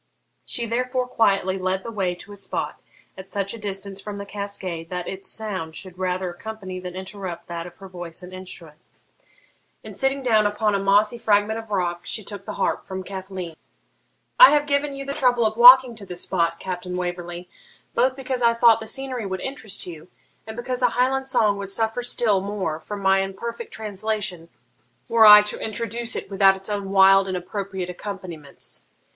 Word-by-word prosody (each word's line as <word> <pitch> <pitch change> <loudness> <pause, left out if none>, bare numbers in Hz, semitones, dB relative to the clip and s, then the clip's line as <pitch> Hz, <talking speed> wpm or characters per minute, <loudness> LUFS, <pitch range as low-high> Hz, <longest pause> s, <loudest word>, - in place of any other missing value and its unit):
She 235 - -1
therefore 250 +2 -1
quietly 195 -5 +2
led 185 +1 -1
the 230 - -6
way 190 -5 -1
to 195 - -11
a - - -8
spot 195 - -4 0.3
at 190 0 -10
such 200 0 -2
a 230 - -8
distance 195 -1 -5
from 205 0 -6
the 200 - -6
cascade 195 -5 -5
that 180 -1 -4
its 190 0 -5
sound 185 -8 -4
should 185 -2 -8
rather 185 0 -1
accompany 190 0 -7
than 180 0 -7
interrupt 185 -2 -6
that 170 0 -5
of 175 - -13
her 195 - -11
voice 175 -1 -7
and 180 +1 -10
instrument, 170 -4 -8 1.0
and, - - -8
sitting 270 0 0
down 220 -4 +4
upon 210 0 0
a 200 - +1
mossy 205 +4 +3
fragment 215 +1 +2
of 225 -1 -10
rock, 175 -4 -1
she 215 - -2
took 200 -1 -8
the - - -5
harp - - -1
from 190 0 -5
Cathleen. 190 -3 -6 0.8
'I - - +12
have 295 0 +3
given 285 0 0
you 275 0 -6
the 280 - -3
trouble 250 -5 +2
of 215 0 +1
walking 250 +1 +9
to 205 - -8
this 180 -1 -6
spot, 170 -2 0
Captain 180 -1 -5
Waverley, 175 -1 -4 0.5
both 260 0 +2
because 260 -2 -3
I 235 -1 +4
thought 230 -1 +6
the 220 - -6
scenery 255 -4 -3
would 190 -1 -4
interest 225 -7 -4
you, 165 -2 -9 0.4
and 220 +1 -7
because 250 +1 -3
a 245 - +4
Highland 265 +2 +1
song 215 -6 +2
would 200 -1 -5
suffer 225 +4 0
still 225 -5 +1
more 190 -6 -3
from 205 +5 -7
my 195 0 +4
imperfect 230 - -5
translation 210 -5 -4 0.6
were 225 -1 +6
I 210 0 +11
to 210 - -5
introduce 230 +1 -3
it - - -5
without 195 0 +5
its 195 +2 -5
own 200 -1 -3
wild 195 0 +6
and 185 -1 -2
appropriate 190 0 -4
accompaniments. 180 -6 -7
200 Hz, 190 wpm, -23 LUFS, 185-225 Hz, 1.0 s, I